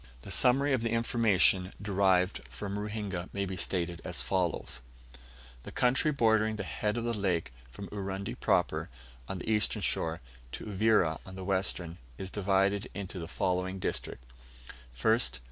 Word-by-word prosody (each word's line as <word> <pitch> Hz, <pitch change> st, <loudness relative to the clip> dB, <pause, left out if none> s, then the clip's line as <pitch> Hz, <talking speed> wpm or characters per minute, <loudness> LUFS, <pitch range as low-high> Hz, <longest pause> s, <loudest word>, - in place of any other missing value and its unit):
The 95 Hz, -, -8 dB
summary 135 Hz, +7 st, +4 dB
of 130 Hz, -, +2 dB
the 115 Hz, -, 0 dB
information 110 Hz, -5 st, +3 dB
derived 95 Hz, -2 st, +2 dB
from 100 Hz, 0 st, -4 dB
Ruhinga 105 Hz, -4 st, -4 dB
may 100 Hz, 0 st, -1 dB
be 95 Hz, 0 st, -4 dB
stated 90 Hz, -2 st, -1 dB
as -, -, -1 dB
follows: 90 Hz, -9 st, -1 dB, 0.8 s
The -, -, -9 dB
country 130 Hz, +5 st, +2 dB
bordering 110 Hz, -5 st, +3 dB
the 105 Hz, -, -3 dB
head 105 Hz, +4 st, -2 dB
of 120 Hz, -, -1 dB
the 120 Hz, 0 st, 0 dB
lake 90 Hz, -, 0 dB, 0.2 s
from 100 Hz, +11 st, -8 dB
Urundi 100 Hz, 0 st, -4 dB
proper, -, -, +1 dB, 0.4 s
on 95 Hz, -, -3 dB
the 90 Hz, -, -5 dB
eastern 105 Hz, -1 st, +2 dB
shore, 80 Hz, +2 st, 0 dB, 0.3 s
to -, -, -6 dB
Uvira 105 Hz, -5 st, +2 dB
on 95 Hz, -, -10 dB
the 95 Hz, -1 st, -6 dB
western, 95 Hz, -3 st, -1 dB, 0.2 s
is 95 Hz, 0 st, -6 dB
divided 100 Hz, +2 st, +1 dB
into 100 Hz, -2 st, -5 dB
the 80 Hz, -, -5 dB
following 90 Hz, +2 st, -1 dB
districts: 65 Hz, -8 st, -3 dB, 0.7 s
1st. -, -, +3 dB
100 Hz, 155 wpm, -31 LUFS, 90-110 Hz, 0.8 s, summary